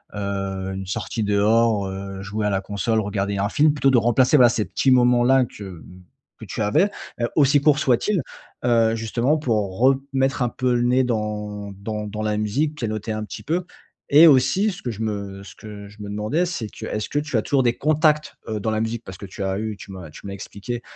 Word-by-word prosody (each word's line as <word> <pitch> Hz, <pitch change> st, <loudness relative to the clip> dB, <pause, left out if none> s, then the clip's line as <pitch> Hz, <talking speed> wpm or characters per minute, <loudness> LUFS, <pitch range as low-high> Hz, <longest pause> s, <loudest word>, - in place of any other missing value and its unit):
heu -, -, -6 dB
heu, 95 Hz, -1 st, -3 dB
une 95 Hz, -1 st, -6 dB
sortie 110 Hz, +3 st, -3 dB
dehors, 105 Hz, +1 st, +2 dB
heu, 95 Hz, 0 st, -6 dB
jouer 105 Hz, 0 st, -2 dB
à -, -, +1 dB
la 95 Hz, -1 st, 0 dB
console, 105 Hz, +3 st, -1 dB
regarder 100 Hz, -1 st, -2 dB
un 100 Hz, +1 st, 0 dB
film 150 Hz, +4 st, +4 dB
plutôt 140 Hz, -2 st, +2 dB
de 120 Hz, -, +5 dB
remplacer, 125 Hz, +5 st, +3 dB
voilà, 120 Hz, -2 st, +7 dB
ces 110 Hz, -2 st, -1 dB
petits 135 Hz, -, 0 dB
moments-là 125 Hz, +1 st, +4 dB
que, 105 Hz, -, -11 dB
mmh, 90 Hz, -1 st, -11 dB, 0.4 s
que -, -, -9 dB
tu -, -, -5 dB
avais, 155 Hz, -, +3 dB, 0.3 s
heu, 120 Hz, -, +2 dB
aussi 145 Hz, -1 st, +4 dB
courts 150 Hz, 0 st, +4 dB
soient-ils, 155 Hz, -, +1 dB, 0.4 s
heu, 115 Hz, -2 st, +3 dB
justement, 115 Hz, +6 st, 0 dB
pour 105 Hz, -9 st, -1 dB
remettre 135 Hz, 0 st, +1 dB
un 120 Hz, -, +2 dB
peu 125 Hz, 0 st, 0 dB
le 120 Hz, -, +1 dB
nez 125 Hz, +2 st, +3 dB
dans 105 Hz, -3 st, -3 dB
dans 105 Hz, +1 st, -4 dB
dans 105 Hz, +1 st, -5 dB
la 105 Hz, -1 st, 0 dB
musique, 140 Hz, +9 st, -1 dB
pianoter 110 Hz, -3 st, -3 dB
un 110 Hz, 0 st, -3 dB
petit -, -, -8 dB
peu 175 Hz, +3 st, -1 dB, 0.4 s
et 155 Hz, +4 st, +8 dB
aussi 165 Hz, +9 st, +4 dB
ce 180 Hz, -, -10 dB
que 120 Hz, -, -3 dB
je 110 Hz, 0 st, -7 dB
me 100 Hz, -3 st, -4 dB
ce 95 Hz, -, -12 dB
que 105 Hz, -1 st, -10 dB
je 105 Hz, +1 st, -14 dB
me 100 Hz, -, -7 dB
demandais, 110 Hz, +12 st, 0 dB
c'est 170 Hz, -11 st, -4 dB
que, -, -, -9 dB
est-ce 105 Hz, 0 st, -3 dB
que 145 Hz, -, 0 dB
tu 150 Hz, -5 st, -2 dB
as -, -, +2 dB
toujours 135 Hz, +4 st, +1 dB
des 120 Hz, -1 st, +1 dB
contacts, 150 Hz, 0 st, +2 dB
heu, 110 Hz, -1 st, -2 dB
dans 110 Hz, -, -2 dB
la 110 Hz, 0 st, 0 dB
musique? 115 Hz, +1 st, -3 dB
Parce 95 Hz, 0 st, -9 dB
que 100 Hz, -, -8 dB
tu 95 Hz, +1 st, -9 dB
as 95 Hz, 0 st, -1 dB
eu 110 Hz, -1 st, -4 dB
tu 100 Hz, -, -11 dB
m'as 90 Hz, -5 st, -9 dB
tu 100 Hz, -, -11 dB
m'as 100 Hz, -, -5 dB
expliqué, 105 Hz, +4 st, -6 dB
110 Hz, 230 wpm, -22 LUFS, 100-130 Hz, 0.4 s, et